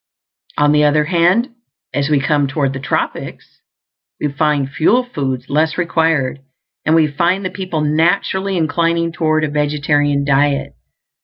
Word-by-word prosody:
On 145 Hz, 0 st, +3 dB
the 150 Hz, 0 st, +3 dB
other 150 Hz, +1 st, +3 dB
hand, 180 Hz, -, +2 dB, 0.4 s
as 140 Hz, 0 st, -1 dB
we 150 Hz, -2 st, +3 dB
come 145 Hz, 0 st, +1 dB
toward 135 Hz, -1 st, -1 dB
the 130 Hz, -, -5 dB
tropics, 135 Hz, -, -4 dB, 0.6 s
we 150 Hz, -, -1 dB
find 145 Hz, -1 st, 0 dB
fuel 215 Hz, -, +2 dB
foods 135 Hz, -, -4 dB
less 155 Hz, +2 st, 0 dB
required; 160 Hz, -6 st, 0 dB, 0.4 s
and 155 Hz, -, +2 dB
we 160 Hz, -1 st, +4 dB
find 175 Hz, +6 st, 0 dB
the 185 Hz, -, -3 dB
people 185 Hz, -4 st, -4 dB
naturally 180 Hz, +5 st, 0 dB
inclining 170 Hz, +1 st, 0 dB
toward 155 Hz, -1 st, 0 dB
a -, -, +1 dB
vegetarian 145 Hz, -1 st, 0 dB
diet. 140 Hz, 0 st, +1 dB
150 Hz, 145 wpm, -17 LUFS, 145-170 Hz, 0.6 s, we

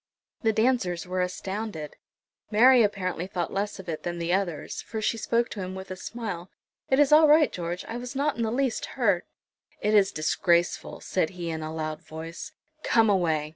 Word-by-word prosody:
The 225 Hz, -, +3 dB
dancers 220 Hz, -7 st, +1 dB
were 185 Hz, 0 st, -1 dB
astounded. 185 Hz, -3 st, -4 dB, 0.5 s
Mary 245 Hz, +4 st, +6 dB
apparently 185 Hz, -4 st, -1 dB
thought 180 Hz, -3 st, -3 dB
less 205 Hz, +1 st, -2 dB
of 190 Hz, -, -10 dB
it 160 Hz, -2 st, -4 dB
than 175 Hz, 0 st, -4 dB
the 170 Hz, +1 st, -1 dB
others, 185 Hz, -5 st, -2 dB
for 220 Hz, +1 st, -5 dB
she 215 Hz, -, 0 dB
spoke 235 Hz, +1 st, +1 dB
to 210 Hz, -, -7 dB
him 185 Hz, 0 st, -4 dB
with 190 Hz, 0 st, -8 dB
a -, -, -3 dB
smile. 190 Hz, -3 st, -6 dB, 0.4 s
"It 265 Hz, -, +4 dB
is 290 Hz, -1 st, +4 dB
all 310 Hz, +1 st, +8 dB
right, 300 Hz, 0 st, +6 dB
George; 175 Hz, 0 st, -4 dB
I 230 Hz, -, -4 dB
was 245 Hz, +2 st, -7 dB
not 285 Hz, +2 st, +1 dB
in 235 Hz, -, -4 dB
the 225 Hz, -, +1 dB
least 260 Hz, 0 st, 0 dB
hurt." 200 Hz, -8 st, +2 dB, 0.5 s
"It 210 Hz, -, +1 dB
is 200 Hz, -2 st, +5 dB
disgraceful!" 170 Hz, +3 st, +1 dB
said 170 Hz, -4 st, 0 dB
he, 170 Hz, -2 st, -3 dB
in 160 Hz, 0 st, -4 dB
a 155 Hz, 0 st, -4 dB
loud 155 Hz, 0 st, -4 dB
voice; 165 Hz, -, -8 dB, 0.3 s
"come 225 Hz, -6 st, +4 dB
away." 160 Hz, -6 st, +1 dB
190 Hz, 195 wpm, -27 LUFS, 170-230 Hz, 0.5 s, all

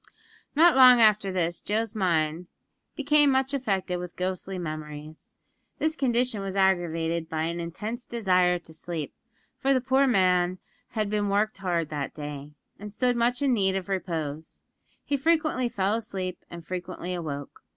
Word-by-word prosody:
Not 330 Hz, +1 st, +6 dB
long 255 Hz, -2 st, +8 dB
after 210 Hz, -3 st, +4 dB
this, 175 Hz, -2 st, -1 dB
Joe's 220 Hz, +1 st, -1 dB
mind 170 Hz, -4 st, 0 dB, 0.5 s
became 295 Hz, 0 st, +4 dB
much 265 Hz, +1 st, +1 dB
affected 195 Hz, -9 st, -1 dB
with 180 Hz, -1 st, -7 dB
ghostly 185 Hz, +1 st, -3 dB
memories. 155 Hz, -2 st, -7 dB, 0.5 s
This 315 Hz, 0 st, 0 dB
condition 245 Hz, -5 st, +1 dB
was 195 Hz, -1 st, -4 dB
aggravated 170 Hz, -4 st, +1 dB
by 160 Hz, -1 st, -2 dB
an 170 Hz, +1 st, -2 dB
intense 210 Hz, +8 st, -5 dB
desire 185 Hz, -6 st, +2 dB
to 160 Hz, -2 st, -13 dB
sleep, 160 Hz, -2 st, -5 dB, 0.5 s
for 270 Hz, 0 st, +2 dB
the -, -, +3 dB
poor 265 Hz, +2 st, +2 dB
man 185 Hz, -5 st, +2 dB, 0.4 s
had 215 Hz, -1 st, +1 dB
been 205 Hz, 0 st, 0 dB
hard 205 Hz, +2 st, +1 dB
worked 170 Hz, -4 st, -1 dB
that 145 Hz, -2 st, -4 dB
day, 145 Hz, -1 st, -7 dB, 0.3 s
and 210 Hz, +1 st, -8 dB
stood 245 Hz, +4 st, +1 dB
much 245 Hz, +3 st, +1 dB
in 270 Hz, -2 st, +3 dB
need 190 Hz, -4 st, +2 dB
of 195 Hz, 0 st, -4 dB
repose. 160 Hz, -5 st, -4 dB, 0.4 s
He 285 Hz, -, 0 dB
frequently 310 Hz, -4 st, +1 dB
fell 195 Hz, -1 st, 0 dB
asleep, 190 Hz, -5 st, -4 dB
and 170 Hz, -1 st, -9 dB
frequently 180 Hz, +1 st, -5 dB
awoke. 145 Hz, -5 st, -6 dB
190 Hz, 155 wpm, -26 LUFS, 170-235 Hz, 0.5 s, long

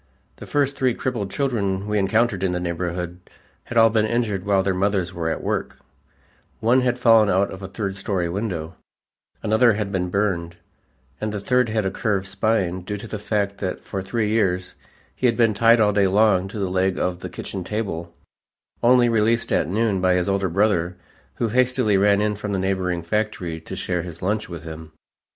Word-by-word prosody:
The -, -, -10 dB
first 145 Hz, -1 st, +1 dB
three 130 Hz, -3 st, +1 dB
crippled 115 Hz, -7 st, -3 dB
children 100 Hz, -7 st, -1 dB
we 105 Hz, 0 st, 0 dB
encountered 110 Hz, 0 st, +1 dB
in 95 Hz, -2 st, 0 dB
the 90 Hz, -, -1 dB
neighborhood 90 Hz, 0 st, -3 dB, 0.5 s
had 120 Hz, -, -4 dB
all 115 Hz, -1 st, +6 dB
been 110 Hz, -1 st, +2 dB
injured 110 Hz, -5 st, -1 dB
while 100 Hz, -2 st, +2 dB
their 95 Hz, 0 st, +1 dB
mothers 95 Hz, -1 st, 0 dB
were 85 Hz, -2 st, -2 dB
at -, -, -3 dB
work: -, -, -2 dB, 0.8 s
one 120 Hz, +4 st, +3 dB
had 125 Hz, -1 st, +1 dB
fallen 115 Hz, -4 st, +5 dB
out 95 Hz, +2 st, +2 dB
of 95 Hz, -, -8 dB
a 95 Hz, -, -5 dB
third 95 Hz, 0 st, -4 dB
story 95 Hz, -2 st, -2 dB
window, 90 Hz, -3 st, -3 dB, 0.7 s
another 110 Hz, +2 st, +4 dB
had 105 Hz, -1 st, -3 dB
been 90 Hz, -2 st, -1 dB
burned, 90 Hz, -4 st, -1 dB, 0.7 s
and 110 Hz, 0 st, -1 dB
the 105 Hz, -, -3 dB
third 125 Hz, +3 st, +2 dB
had 110 Hz, -2 st, 0 dB
a 95 Hz, -, 0 dB
curved 100 Hz, -3 st, -1 dB
spine 95 Hz, -2 st, 0 dB
due 105 Hz, +3 st, -5 dB
to 110 Hz, +3 st, -9 dB
the 105 Hz, -, -5 dB
fact 100 Hz, -1 st, -1 dB
that 95 Hz, -2 st, -3 dB
for 95 Hz, -, -4 dB
three 105 Hz, +2 st, -1 dB
years 95 Hz, -5 st, 0 dB, 0.4 s
he 130 Hz, -, +1 dB
had 115 Hz, -, +1 dB
been 115 Hz, -3 st, +4 dB
tied 115 Hz, +3 st, +5 dB
all 105 Hz, -1 st, +3 dB
day 100 Hz, -1 st, +3 dB
long 95 Hz, -1 st, +3 dB
to 100 Hz, -, -8 dB
the 95 Hz, -3 st, -2 dB
leg 95 Hz, 0 st, +1 dB
of 90 Hz, -1 st, -1 dB
the -, -, -6 dB
kitchen 95 Hz, -2 st, -6 dB
table, 90 Hz, -4 st, -4 dB, 0.7 s
only 125 Hz, 0 st, +5 dB
released 115 Hz, 0 st, +1 dB
at -, -, +1 dB
noon 105 Hz, -1 st, +1 dB
by 90 Hz, 0 st, +3 dB
his 90 Hz, -1 st, 0 dB
older 100 Hz, -1 st, 0 dB
brother 90 Hz, -2 st, +1 dB, 0.4 s
who 115 Hz, -, -1 dB
hastily 125 Hz, -2 st, +2 dB
ran 100 Hz, +1 st, +4 dB
in 105 Hz, 0 st, +1 dB
from 105 Hz, 0 st, -3 dB
a -, -, 0 dB
neighboring 95 Hz, -2 st, -1 dB
factory 90 Hz, -4 st, -2 dB
to -, -, -7 dB
share 90 Hz, -1 st, -2 dB
his 85 Hz, -1 st, -9 dB
lunch 105 Hz, +2 st, -1 dB
with 85 Hz, -2 st, -7 dB
him. 80 Hz, -1 st, -9 dB
100 Hz, 200 wpm, -22 LUFS, 90-110 Hz, 0.8 s, all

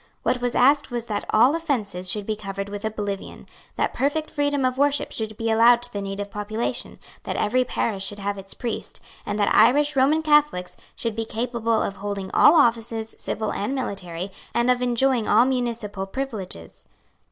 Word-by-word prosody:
What 250 Hz, -, 0 dB
was 245 Hz, -1 st, -1 dB
asked 280 Hz, +3 st, +4 dB
was 240 Hz, -2 st, -3 dB
that 210 Hz, -3 st, -3 dB
all 245 Hz, +6 st, +5 dB
offences 215 Hz, -, -2 dB
should 205 Hz, +1 st, -1 dB
be 215 Hz, -, -1 dB
covered 195 Hz, -1 st, -5 dB
with 205 Hz, +1 st, -6 dB
oblivion, 205 Hz, -2 st, -4 dB, 0.3 s
that -, -, 0 dB
perfect 290 Hz, +4 st, -1 dB
freedom 285 Hz, -2 st, 0 dB
of 255 Hz, +1 st, -1 dB
worship 285 Hz, 0 st, +1 dB
should 215 Hz, -1 st, -4 dB
be 225 Hz, 0 st, -1 dB
allowed 235 Hz, +2 st, +5 dB
to 245 Hz, -, -4 dB
the 200 Hz, -, -3 dB
native 200 Hz, +1 st, -5 dB
population, 215 Hz, +2 st, -3 dB, 0.2 s
that -, -, -4 dB
every 255 Hz, +5 st, +2 dB
parish 215 Hz, -5 st, -2 dB
should 205 Hz, +1 st, -3 dB
have 200 Hz, 0 st, -2 dB
its 195 Hz, 0 st, -6 dB
priest, 240 Hz, -2 st, -5 dB, 0.3 s
and 205 Hz, -, -2 dB
that 205 Hz, -1 st, +2 dB
Irish 285 Hz, +7 st, +5 dB
Roman 290 Hz, +4 st, +3 dB
Catholics 295 Hz, -12 st, +2 dB, 0.2 s
should 230 Hz, -2 st, -3 dB
be 225 Hz, -, -1 dB
capable 230 Hz, 0 st, -1 dB
of 195 Hz, -, -4 dB
holding 200 Hz, -1 st, -4 dB
all 300 Hz, -, +7 dB
offices, 230 Hz, -5 st, +2 dB
civil 220 Hz, -1 st, -3 dB
and 210 Hz, +7 st, -2 dB
military, 190 Hz, -7 st, -4 dB, 0.2 s
and 240 Hz, +1 st, +3 dB
of 250 Hz, 0 st, +1 dB
enjoying 245 Hz, -1 st, +1 dB
all 225 Hz, +4 st, +5 dB
municipal 235 Hz, -6 st, -2 dB
privileges. 200 Hz, -, -6 dB
225 Hz, 180 wpm, -24 LUFS, 205-255 Hz, 0.3 s, all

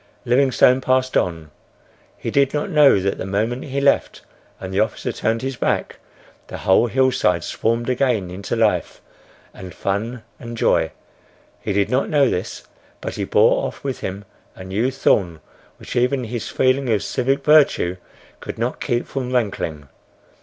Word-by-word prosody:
Livingstone 130 Hz, 0 st, +4 dB
passed 130 Hz, 0 st, +1 dB
on. 80 Hz, -4 st, -1 dB, 0.7 s
He -, -, -4 dB
did 140 Hz, 0 st, +2 dB
not 150 Hz, +7 st, -2 dB
know 150 Hz, -, +6 dB
that 95 Hz, +1 st, -2 dB
the -, -, -4 dB
moment 110 Hz, +6 st, -1 dB
he 140 Hz, 0 st, -3 dB
left 140 Hz, 0 st, +1 dB, 0.4 s
and 95 Hz, 0 st, -7 dB
the 95 Hz, -, +1 dB
officer 110 Hz, -, -1 dB
turned 115 Hz, +2 st, -1 dB
his 135 Hz, -1 st, -3 dB
back, -, -, -1 dB, 0.5 s
the -, -, -7 dB
whole 95 Hz, +5 st, +3 dB
hillside 125 Hz, -10 st, +1 dB
swarmed 115 Hz, +1 st, -1 dB
again 125 Hz, -8 st, 0 dB
into 100 Hz, +5 st, -4 dB
life 110 Hz, -2 st, 0 dB, 0.5 s
and 90 Hz, -1 st, -10 dB
fun 110 Hz, +5 st, -3 dB, 0.2 s
and 120 Hz, -1 st, -8 dB
joy. 80 Hz, -7 st, +2 dB, 0.7 s
He -, -, -4 dB
did 100 Hz, +2 st, 0 dB
not 130 Hz, +2 st, +1 dB
know 145 Hz, -4 st, +3 dB
this; 90 Hz, -, -4 dB, 0.4 s
but -, -, -5 dB
he -, -, -3 dB
bore -, -, +3 dB
off -, -, -10 dB
with 135 Hz, -2 st, -3 dB
him 100 Hz, +2 st, -6 dB, 0.3 s
a 95 Hz, -, -10 dB
new 100 Hz, +7 st, -1 dB
thorn 95 Hz, -11 st, +1 dB, 0.4 s
which -, -, -9 dB
even 125 Hz, +2 st, +1 dB
his 120 Hz, -1 st, -5 dB
feeling 130 Hz, 0 st, +1 dB
of 105 Hz, -3 st, +1 dB
civic 135 Hz, +2 st, -1 dB
virtue 145 Hz, -, +4 dB, 0.4 s
could -, -, -7 dB
not -, -, -3 dB
keep 120 Hz, 0 st, -1 dB
from 130 Hz, -2 st, -4 dB
rankling. 95 Hz, -, -2 dB
120 Hz, 160 wpm, -21 LUFS, 100-130 Hz, 0.7 s, know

